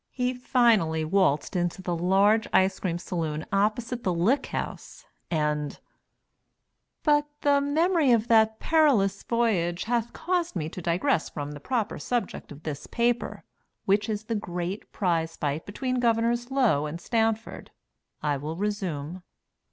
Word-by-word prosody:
He 250 0 -1
finally 230 - +2
waltzed 180 -2 +1
into 175 +1 -1
the 175 -1 -1
large 195 +5 +3
ice 190 0 +3
cream 175 -3 -1
saloon 160 -3 -3
opposite 220 +4 0
the 185 - +1
Lick 210 +12 +1
House, - - -6 0.2
and 150 -2 -1 1.2
But 295 -1 +3
the 285 -1 +3
memory 310 0 +2
of 230 -1 +3
that 220 -1 +4
perilous 285 -12 +3
voyage 195 -8 0
hath 235 0 -1
caused 350 - -1
me 155 -3 -2
to 180 - -8
digress 175 - +1
from 145 -1 -5
the 145 - -8
proper 230 - -2
subject 240 -10 -3
of 145 +2 -11
this 150 -2 -5
paper, 240 0 -1 0.4
which 205 +2 +2
is 215 -1 -2
the 230 - -3
great 180 -1 -4
prize 165 -4 0
fight 145 +2 -2
between 255 +5 -2
Governors 235 +1 +1
Low 240 - +2
and 160 +3 -6
Stanford. 225 +3 -1 0.5
I 145 -1 +1
will 150 +4 -5
resume. 185 -5 -3
205 Hz, 145 wpm, -27 LUFS, 170-240 Hz, 1.2 s, that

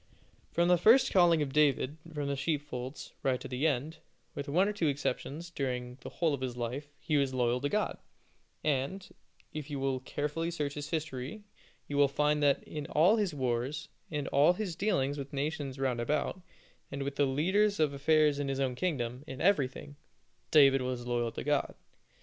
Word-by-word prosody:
From 170 +1 +2
the 180 -1 +4
first 230 +9 +6
calling 170 -4 +5
of 135 -2 -5
David 150 -1 +2
from 145 -2 -3
the 140 - -1
sheepfolds, 140 -3 -4
right 130 -2 +1
to - - -7
the 130 +5 0
end, 150 +3 -1 0.4
with 140 0 -5
one 180 +7 +3
or 210 - -1
two 175 -6 0
exceptions, 145 +3 -3
during 125 -3 -3
the - - -7
whole 165 -3 0
of 140 - -3
his 125 -2 -3
life, 125 +5 -3
he 150 - 0
was 135 -2 +1
loyal 125 0 +1
to 145 - 0
God, 210 +5 -1 0.6
and, 155 +6 -1 0.5
if 155 -1 -6
you 145 -2 -3
will 135 -1 0
carefully 150 +5 -3
search 150 -4 -2
his 145 0 -6
history, 155 +3 -4 0.4
you 145 - -3
will 145 0 +6
find 150 +2 +1
that 140 -1 +3
in 150 -2 -6
all 175 +9 +4
his 195 -7 0
wars, 130 +3 -2 0.2
and 150 -3 -3
all 145 +5 +5
his 180 -3 -4
dealings 145 -9 0
with 140 0 -5
the - - -8
nations 140 -1 -3
round 130 -3 0
about, 150 +8 -1 0.5
and 140 0 -3
with 140 0 -4
the 145 -1 +3
leaders 190 +10 +2
of 150 -2 +2
affairs 150 +1 +3
in 145 - -1
his 135 0 -2
own 130 -2 0
kingdom 125 -5 -2
in 130 0 -7
everything, 145 -5 0 0.5
David 135 -3 +6
was 125 -1 -3
loyal 120 -1 0
to - - -6
God. 145 -1 0
145 Hz, 190 wpm, -31 LUFS, 135-160 Hz, 0.6 s, first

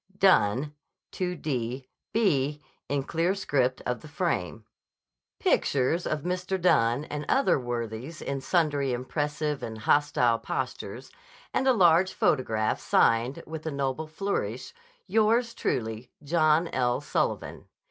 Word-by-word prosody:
Dunne, 145 - +3 0.4
2d 135 -8 -3 0.3
b." 150 -9 +1 0.3
in 140 -1 0
clear 170 +6 0
script 135 -9 0
on 125 - -1
the 155 - -12
frame), 115 - -2 0.7
pictures 140 +6 +1
of 155 -1 -1
Mr. 185 +1 -2
Dunne 125 -6 +3
and 150 -1 -5
other 270 - +3
worthies 120 +4 -5
in 140 -1 -3
sundry 145 -5 +1
impressive 145 +3 -2
and 110 -1 -5
hostile 125 -1 +2
postures, - - -5 0.4
and 265 - +1
a 260 - +6
large 180 -3 +4
photograph 110 -4 +1
signed, 115 +4 +2
with 160 0 -7
a - - -1
noble 140 +2 -2
flourish, 195 +6 -3 0.3
"Yours 230 +2 +2
truly, 110 0 -3
John 155 +2 +3
L. 125 -1 0
Sullivan." - - -2
145 Hz, 120 wpm, -27 LUFS, 125-170 Hz, 0.7 s, a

